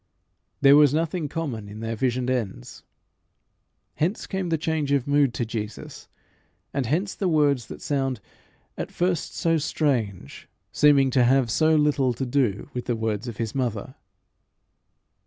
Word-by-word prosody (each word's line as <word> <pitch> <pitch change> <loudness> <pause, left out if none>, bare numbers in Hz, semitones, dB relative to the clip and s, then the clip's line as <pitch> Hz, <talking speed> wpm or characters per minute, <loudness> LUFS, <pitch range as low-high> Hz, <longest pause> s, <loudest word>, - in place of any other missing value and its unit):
There 140 0 +7
was 145 -1 +5
nothing 160 -1 -1
common 130 -11 -4
in 105 +1 -9
their 115 0 -3
visioned 125 +1 0
ends. 100 - -4 1.1
Hence 175 +8 -1
came 190 -3 -3
the 165 - +1
change 155 -2 -1
of 140 -2 +1
mood 145 -2 +3
to 120 - -1
Jesus, 110 -2 -7 0.7
and 135 -4 -1
hence 180 - 0
the 195 - -2
words 145 -7 +2
that - - -9
sound 135 -4 -1 0.6
at - - -4
first 175 -2 -1
so 165 -1 +1
strange, 115 - -2 0.2
seeming 140 -3 +4
to 125 -1 +3
have 125 -1 +3
so 160 +5 +3
little 145 -4 +2
to 135 - -3
do 120 -6 0
with 125 - -4
the 120 - -1
words 110 0 -2
of 115 -4 -6
his 115 -2 -3
mother. 125 -2 -3
135 Hz, 155 wpm, -24 LUFS, 115-150 Hz, 1.1 s, There